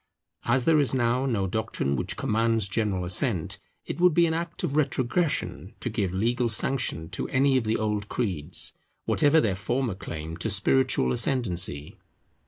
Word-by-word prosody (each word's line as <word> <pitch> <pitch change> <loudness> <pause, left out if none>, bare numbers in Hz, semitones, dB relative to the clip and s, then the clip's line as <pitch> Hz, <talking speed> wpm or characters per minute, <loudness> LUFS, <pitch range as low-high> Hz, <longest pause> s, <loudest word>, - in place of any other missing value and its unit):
As 125 +1 +1
there 160 -2 +4
is 140 -2 +1
now 125 +2 +1
no 110 -7 0
doctrine 90 -8 -2
which - - -3
commands 115 -1 +2
general 100 -3 -1
assent, 90 0 0 0.3
it - - -5
would 180 -3 +5
be 170 - +5
an 160 - 0
act 170 +2 -4
of 150 -5 -2
retrogression 150 +2 -1
to - - -4
give 95 -3 -1
legal 120 +5 0
sanction 110 -7 0
to - - -4
any 135 +1 +2
of 130 -3 +1
the 110 +1 +1
old 105 -1 -2
creeds, 90 -8 -1 0.3
whatever 150 +1 +3
their 110 -8 +1
former 110 +5 -2
claim 80 -3 -7
to 90 - -2
spiritual 105 - +2
ascendancy. 90 - 0
115 Hz, 165 wpm, -26 LUFS, 95-135 Hz, 0.3 s, would